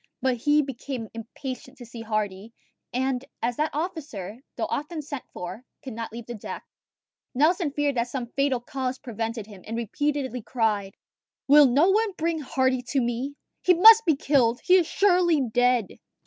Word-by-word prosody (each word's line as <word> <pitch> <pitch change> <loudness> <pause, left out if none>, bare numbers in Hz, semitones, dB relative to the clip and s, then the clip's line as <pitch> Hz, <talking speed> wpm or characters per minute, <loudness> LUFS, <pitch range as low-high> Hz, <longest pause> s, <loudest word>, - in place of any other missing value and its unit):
But 260 -2 +1
he 295 +5 +3
became 260 -3 -6
impatient 255 +3 -8
to 245 - -10
see 230 0 -9
Hardy; 215 -1 -3 0.4
and 260 0 -1 0.2
as 240 +1 -1
that 305 +1 +1
officer, 280 - -5 0.2
though - - -1
often 305 +1 -4
sent 285 -3 -6
for, 180 +6 -7 0.2
could 260 - -7
not 230 +1 -5
leave 235 0 -8
the 240 - -6
deck, 215 - -7 0.7
Nelson 325 +4 +3
feared 290 0 0
that 235 +1 +1
some 245 -1 -5
fatal 275 -2 +1
cause 255 +1 -4
prevented 225 -3 -4
him, 205 -3 -13
and 225 +1 -5
repeatedly 260 +2 -2
cried, 210 -4 -1 0.5
"Will 290 0 +8
no 290 +10 +4
one 430 0 +1
bring 330 -1 -1
Hardy 260 -2 0
to 275 - +1
me? 245 +3 -2 0.3
He 365 - +4
must 445 +5 +9
be 320 - +5
killed! 255 -4 +2
He 365 - +3
is 345 -4 +2
surely 355 -4 +3
dead!" 245 -3 +1
260 Hz, 170 wpm, -25 LUFS, 230-295 Hz, 0.7 s, must